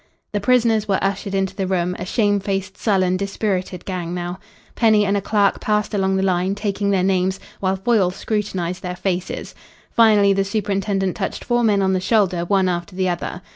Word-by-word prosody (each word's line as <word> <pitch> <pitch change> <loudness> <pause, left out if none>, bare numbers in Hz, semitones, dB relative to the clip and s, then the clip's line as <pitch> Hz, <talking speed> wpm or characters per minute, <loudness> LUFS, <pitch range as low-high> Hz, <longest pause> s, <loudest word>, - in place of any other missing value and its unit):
The 205 - -1
prisoners 225 -2 +3
were 195 -2 +2
ushered 195 0 -2
into 195 -1 -1
the 195 -3 -2
room, 180 -1 0
a 180 - -4
shame 205 0 +1
faced, 195 0 -3
sullen, 185 -4 +1
dispirited 195 -2 -3
gang 180 -2 -4
now. 175 +1 -4 0.3
Penny 215 -3 +4
and 200 0 +1
a 200 - 0
clerk 200 0 +2
passed 210 0 0
along 190 -1 +1
the 190 - +1
line, 185 +1 +1
taking 205 -1 -1
their 190 -2 +2
names, 190 0 +1 0.2
while 190 0 0
Foyle 195 -1 +2
scrutinised 185 -3 -3
their 180 -1 -4
faces. 180 -1 -3 0.4
Finally, 210 -3 +5
the 195 0 +1
superintendent 195 -2 -1
touched 195 - -4
four 240 -1 +1
men 205 -3 +3
on 190 0 +2
the 185 - +1
shoulder 190 -4 +2
one 190 0 +2
after 175 +1 -3
the 185 -1 0
other. 175 +1 -4
195 Hz, 190 wpm, -21 LUFS, 185-205 Hz, 0.4 s, Finally